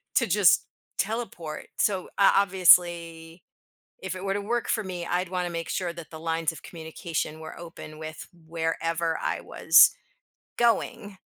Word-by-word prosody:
to - - +4
just - - +4 0.3
teleport. 195 -8 -4
So, 190 -3 0
uh, 200 - +6
obviously, 175 -3 +3 0.6
if 190 -1 -4
it 185 +1 -7
were 195 0 -1
to 205 - -1
work 235 +4 -2
for 220 - 0
me, 180 -2 -5
I'd 180 +2 -1
wanna 180 -1 -2
make 165 -1 -5
sure 180 -2 -2
that 170 -2 -11
the 160 - -9
lines 165 0 -1
of 165 - -12
communication 160 -1 -5
were 160 0 -9
open 165 -2 -10
with 155 0 -8 0.2
wherever 165 0 -1
I - - -2
was - - +6 0.7
going, 215 -4 0
170 Hz, 155 wpm, -26 LUFS, 165-190 Hz, 0.7 s, uh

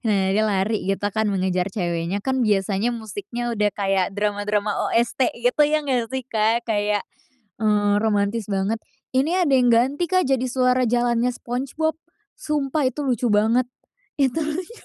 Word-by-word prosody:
Nah, 195 -3 +1
dia 215 - +2
lari 210 +1 0
gitu 195 +2 -1
kan 220 -1 +1
mengejar 185 -2 0
ceweknya, 175 -1 -2
kan 260 0 0
biasanya 205 +1 +1
musiknya 230 +1 -5
udah 210 -1 +1
kayak 195 -2 +1
drama-drama 205 0 -1 0.2
OST 240 +2 +1
gitu, 245 +5 +2
ya 305 +1 +2
nggak 250 -5 -1
sih, 260 0 -3
Kak, 225 0 +1
kayak, 210 -2 0 0.6
eee, 205 -1 +2
romantis 210 0 0
banget. 195 +3 0 0.4
Ini 330 +8 +2
ada 285 - +1
yang 250 -2 +4
ganti, 265 +9 +2
Kak, 370 -3 +2
jadi 265 -2 +1
suara 255 0 +2
jalannya 240 +1 +1
SpongeBob. 270 +7 -2 0.4
Sumpah 295 - -1
itu 295 - -5
lucu 245 -1 0
banget. 220 +4 +3 0.5
Itu 275 +3 +1
lucu. 350 +10 -5
230 Hz, 155 wpm, -22 LUFS, 205-260 Hz, 0.6 s, yang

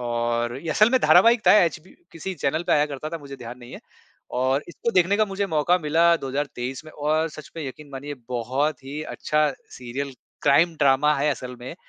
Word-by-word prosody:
और 120 0 -1
ये 165 - -3
असल 215 +8 +4
में 260 - +4
धारावाहिक 230 0 +6
था, - - +8
एचबी 170 +1 -4 0.2
किसी 185 +4 -5
चैनल 155 +1 -1
पे - - +2
आया 150 0 +4
करता 145 +1 -6
था, 165 - -4
मुझे 140 -2 -10
ध्यान 120 0 -9
नहीं 120 -1 -12
है। - - -9 0.6
और 130 +3 +1
इसको 205 +6 -3
देखने 185 +1 +3
का 215 - +3
मुझे 200 0 -2
मौका 165 +1 +2
मिला 165 +2 +3
2023 135 -1 -4
में 155 - -11
और 155 +2 0
सच 155 - -11
में 160 -3 -4
यकीन 145 +3 -9
मानिए, 140 +2 -6
बहुत 130 +4 -1
ही 145 +3 -5
अच्छा 150 -1 0 0.3
सीरियल 130 +3 -5 0.3
क्राइम 165 +4 +4
ड्रामा 140 +1 +3
है 150 +2 +2
असल 125 -3 -5
में। 125 +5 -7
150 Hz, 200 wpm, -24 LUFS, 130-165 Hz, 0.6 s, था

